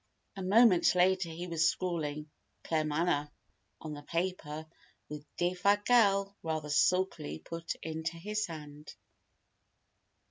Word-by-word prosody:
A 195 - -6
moment 195 -1 +5
later 185 0 +3
he 165 +2 -6
was 165 -2 +2
scrawling 150 -4 -3 0.3
"Claremanagh" 155 -1 0 0.5
on 155 -1 -6
the 145 - -8
paper 165 -1 -3 0.4
which 150 0 -6 0.2
Defasquelle 200 +3 +3
rather 155 -2 -3
sulkily 180 - +1
put 165 - -6
into 160 +1 -4
his 210 +5 -2
hand. 150 -2 -10
170 Hz, 105 wpm, -31 LUFS, 155-185 Hz, 0.5 s, moment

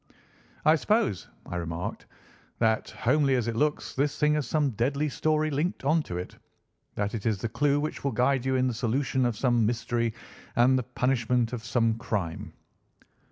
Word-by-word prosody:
"I 155 +1 +6
suppose," 210 - +1 0.2
I 90 - -5
remarked, 85 0 -4 0.5
"that, 110 -1 +1
homely 135 +2 +2
as 120 -2 0
it 115 - -2
looks, 150 +4 0
this 140 +1 0
thing 150 0 +3
has 150 -5 -1
some 145 0 +1
deadly 135 +7 0
story 155 +2 0
linked 150 +1 -2
on 155 +3 +3
to 90 - -3
it—that 100 +3 -7
it 115 -1 -3
is 110 -3 +1
the 115 +4 -3
clue 145 +4 +2
which 155 +1 -4
will 140 - 0
guide 125 +2 +2
you 130 0 0
in 130 0 +2
the 125 - -1
solution 125 +2 0
of 115 -3 -3
some 120 -2 +2
mystery 115 0 0 0.4
and 125 +2 +5
the 130 - +2 0.2
punishment 125 -2 +1
of 115 -2 -4
some 115 -2 +1
crime." 95 -8 -3
125 Hz, 175 wpm, -27 LUFS, 115-145 Hz, 0.5 s, I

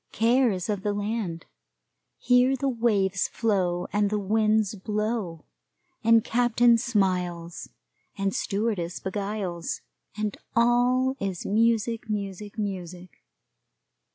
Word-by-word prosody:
Care 240 +3 +3
is 185 -4 -3
of 205 -3 -2
the 205 +1 -1
land 205 -5 -3 0.7
here 250 +2 +3
the 275 +1 -2
waves 210 -6 +1
flow, 185 -6 0
and 205 0 +2
the 210 - 0
winds 215 +1 +1
blow, 210 -4 -3 0.6
and 230 0 +5
captain 240 0 +3
smiles, 180 -6 -1 0.5
and 195 -1 -1
stewardess 200 -4 -2
beguiles, 195 -3 -4 0.4
and 210 -1 -2 0.2
all 245 +2 +3
is 190 -3 -3
music, 225 +1 +1
music, 205 0 -4
music. 185 -3 -5
210 Hz, 105 wpm, -26 LUFS, 190-230 Hz, 0.7 s, and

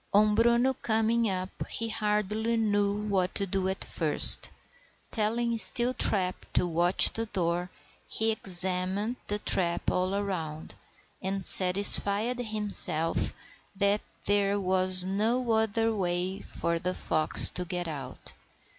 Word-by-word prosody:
On 210 +1 +2
Bruno 235 +4 0
coming 225 -1 -2
up 185 0 -7
he 230 - -5
hardly 215 +1 -3
knew 205 -2 -1
what 190 -2 -3
to 200 - -2
do 190 0 -3
at 190 - -4
first. - - +6 0.6
Telling 230 +2 -3
Steeltrap 220 -7 +1 0.2
to - - 0
watch 175 +2 +4
the 225 0 -5
door, 175 -2 -4 0.4
he 225 0 -3
examined 190 +3 -2
the 205 - -2
trap 175 -4 0
all 185 +2 -3
round, 160 -5 -7 0.5
and 190 -1 -5
satisfied 200 +5 +5
himself 210 -8 -3 0.4
that 200 +1 -1 0.2
there 200 0 -1
was 185 -1 +5
no 225 +6 -2
other 225 0 -1
way 185 -1 -4
for 170 0 -5
the 180 +2 -5
fox 155 0 +2
to 180 - -5
get 175 -1 -6
out. 135 -5 -10
200 Hz, 125 wpm, -26 LUFS, 180-220 Hz, 0.6 s, first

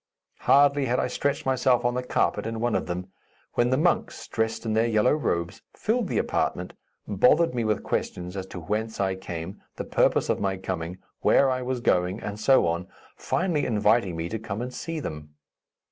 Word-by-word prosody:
Hardly 140 0 +4
had 125 0 +1
I - - +1
stretched 140 +3 -1
myself 130 -1 +2
on 120 - +2
the 125 - -1
carpet 125 -2 0
in 115 0 -4
one 120 0 0
of - - 0
them, 90 +2 -4 0.4
when 120 0 +2
the 130 - +2
monks, 170 +4 0
dressed 115 +1 -2
in 110 - 0
their 110 +2 +3
yellow 110 +1 +3
robes, 90 - -1
filled 235 +3 0
the - - -1
apartment, - - -1 0.3
bothered 170 - +4
me 120 -2 -1
with 110 -2 0
questions 90 +1 -3
as 95 -1 -5
to 95 - -7
whence 105 +6 -3
I 95 -1 +1
came, 90 0 -7
the - - -5
purpose - - +2
of - - 0
my 95 -1 -1
coming, 90 -2 -4 0.2
where 135 -1 +4
I 130 0 -1
was 125 -1 -2
going, 90 0 +1
and 105 -1 -6
so 130 0 +4
on, 85 +2 -1 0.3
finally 175 -5 0
inviting 105 -4 +2
me 80 +1 -3
to 110 - -3
come 105 -1 -5
and 125 +1 -4
see 165 +3 -4
them. 75 - -7
110 Hz, 195 wpm, -26 LUFS, 95-130 Hz, 0.4 s, Hardly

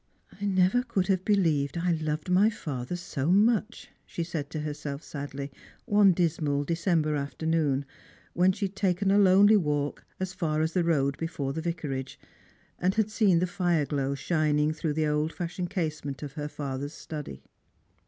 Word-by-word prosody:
" - - -22
I - - -1
never 190 +4 +3
could 235 -7 -1
have 190 -1 +2
believed 165 -8 +1
I 175 +1 +1
loved 155 -1 -2
my 185 +4 +4
father 145 - -5
so 160 -4 -3
much," 220 +3 +2
she 170 - -4
said 160 -4 -4
to 155 - -4
herself 145 -1 -5
sadly, 140 -1 -6 0.3
one 205 -4 +5
dismal 155 -5 0
December 165 -1 +1
afternoon, 145 -1 0 0.5
when 180 +2 +4
she 200 - -2
had 195 0 -6
taken 195 0 +1
a 200 - +5
lonely 200 +2 +6
walk 145 -5 -1 0.2
as 185 0 -3
far 155 -5 -1
as 160 - -1
the 180 - +2
road 140 -5 +1
before 145 -4 -3
the 160 - -3
Vicarage, 150 -6 -4 0.6
and 185 +2 +1
had 220 -1 +1
seen 205 -5 +3
the 175 - +2
fire 175 -5 +1
glow 140 -1 -1
shining 155 0 +1
through 155 -1 -2
the 155 +1 0
old 150 +1 0
fashioned 175 0 -4
casement 155 -7 -3
of 140 -2 -6
her 150 0 -4
father's 145 0 -5
study. 145 - -7
165 Hz, 175 wpm, -28 LUFS, 145-185 Hz, 0.6 s, lonely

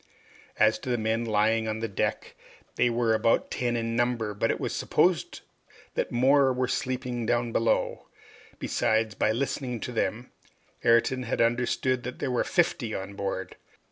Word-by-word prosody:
As - - +4
to - - -6
the 120 - +1
men 110 +1 0
lying 110 +1 +2
on 110 0 -2
the 115 - -2
deck, 100 - -2 0.4
they 125 - +3
were 115 -1 +1
about 110 +1 +2
ten 120 -1 -1
in 115 0 -2
number, 120 -3 0
but 105 - 0
it - - 0
was - - -3
to - - -3
be - - -2
supposed 175 -6 +2 0.5
that - - -2
more 135 +2 +4
were 130 0 0
sleeping 125 -2 -2
down 120 0 +1
below. 115 0 0 0.5
Besides, 110 -1 0
by 105 - +1
listening 125 0 -2
to - - -4
them, 120 +1 -2 0.5
Ayrton 115 +3 +3
had 120 - -3
understood 125 +2 +1
that 125 +1 -6
there 135 - -2
were 125 - +1
fifty 145 - 0
on 95 +1 -5
board. 100 -1 -4
120 Hz, 175 wpm, -27 LUFS, 110-125 Hz, 0.5 s, As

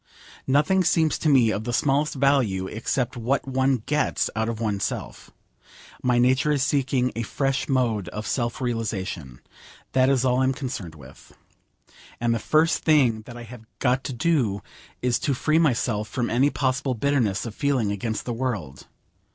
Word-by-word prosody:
Nothing 150 +8 +3
seems 160 -2 +2
to 155 - +1
me 125 -6 +5
of 110 - -2
the 120 - -3
smallest 140 +4 +1
value 130 -9 +2
except 120 +5 -2
what 125 +4 -1
one 130 -3 +1
gets 150 0 0
out 110 +1 0
of 115 -2 -4
oneself. 105 -4 -3 0.7
My 125 -1 +2
nature 130 +5 +3
is 140 -3 +1
seeking 135 -3 +1
a 115 - -2
fresh 135 +3 -1
mode 115 -8 0
of 105 0 -6
self 120 -1 -2
realisation. 100 - -3 0.5
That 130 0 +3
is 130 -2 +2
all 125 0 +2
I 130 - +3
am 135 - +2
concerned 120 - -6
with. 65 -3 -15 0.9
And 120 0 +1
the 115 - -1
first 155 +7 +2
thing 130 -8 +3
that 120 - -9
I 120 - -8
have 120 0 -11 0.2
got 130 0 +1
to 135 - -3
do 120 - 0 0.4
is 125 -1 +2
to 140 - 0
free 155 +5 +2
myself 120 -8 +1
from 125 -3 -2
any 130 +5 +3
possible 130 -1 -1
bitterness 115 -5 0
of 115 - -6
feeling 130 -5 0
against 110 +2 -3
the 120 - -2
world. 110 - -4
125 Hz, 170 wpm, -24 LUFS, 110-135 Hz, 0.9 s, me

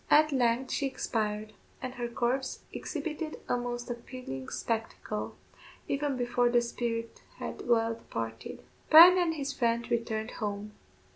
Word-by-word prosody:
At 305 +1 +6
length 250 -1 +1
she 275 - 0
expired, 215 -4 -2 0.3
and 255 -1 -5
her 245 -2 -3
corpse 245 +3 -1
exhibited 310 0 -4
a - - +2
most 245 0 -3
appalling 235 - -7
spectacle, 225 -2 -3 0.5
even 280 -1 0
before 245 0 +2
the 240 0 +4
spirit 230 -1 -3 0.2
had - - -6
well 230 -1 +3
departed. 115 - -6 0.3
Bryan 350 +4 +10
and 335 -2 +1
his 280 -2 -3
friend 235 0 +1
returned 225 -1 -1
home. 205 -1 -4
240 Hz, 135 wpm, -30 LUFS, 225-270 Hz, 0.5 s, Bryan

